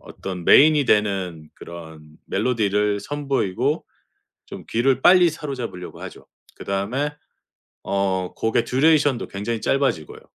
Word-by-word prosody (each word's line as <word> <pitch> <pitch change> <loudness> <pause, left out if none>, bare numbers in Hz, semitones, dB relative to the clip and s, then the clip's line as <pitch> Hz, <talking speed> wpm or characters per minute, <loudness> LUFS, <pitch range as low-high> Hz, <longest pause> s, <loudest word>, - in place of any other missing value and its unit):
어떤 90 -3 -8
메인이 150 - +6
되는 95 -8 0
그런 80 -2 -11 0.3
멜로디를 105 -4 0
선보이고 135 -7 -2 0.6
좀 - - -10
귀를 130 +3 +1
빨리 180 -1 +6
사로잡으려고 130 - -7
하죠. - - -10 0.3
그다음에 110 +10 -2 0.7
어 95 -2 -1
곡의 115 +1 0
듀레이션도 145 0 +2
굉장히 105 +3 -4
짧아지고요. 135 - -1
110 Hz, 290 characters per minute, -22 LUFS, 95-140 Hz, 0.7 s, 메인이